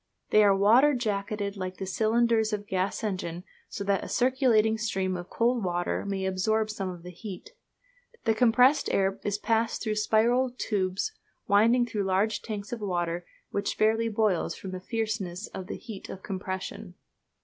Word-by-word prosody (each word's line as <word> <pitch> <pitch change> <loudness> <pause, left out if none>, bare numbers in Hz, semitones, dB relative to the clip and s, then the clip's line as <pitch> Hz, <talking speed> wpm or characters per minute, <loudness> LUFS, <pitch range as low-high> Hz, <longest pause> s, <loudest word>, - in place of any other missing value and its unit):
They 215 - +6
are 200 -1 +5
water 245 +9 +5
jacketed 205 -3 -2
like 185 -1 -5
the 190 - -4
cylinders 220 +2 +2
of 210 - -1
a - - -16
gas 190 +1 -2
engine, 180 -4 -3 0.3
so 200 - -5
that 200 -1 +1
a - - -7
circulating 245 -4 +3
stream 190 -4 -1
of 175 0 -6
cold 235 -1 +1
water 175 +2 -1
may 195 -1 -2
absorb 215 +4 +1
some 195 -3 -4
of 175 -2 -8
the 180 - -8
heat. 185 +2 -9 0.7
The 225 - +3
compressed 250 +5 +4
air 195 0 +1
is 205 0 -1
passed 225 +1 0
through 215 -2 -1
spiral 240 +4 +2
tubes 190 - -1 0.3
winding 230 +4 +4
through 210 -4 -2
large 200 +3 +1
tanks 205 -2 -6
of 230 - -5
water 175 -3 -2 0.2
which 200 0 -1
fairly 225 +1 +2
boils 215 -5 +1
from 190 - -7
the 185 - -5
fierceness 215 -3 -3
of 185 - -7
the - - -5
heat 220 -5 -9
of 190 - -8
compression. 190 -1 -5
210 Hz, 170 wpm, -28 LUFS, 190-225 Hz, 0.7 s, They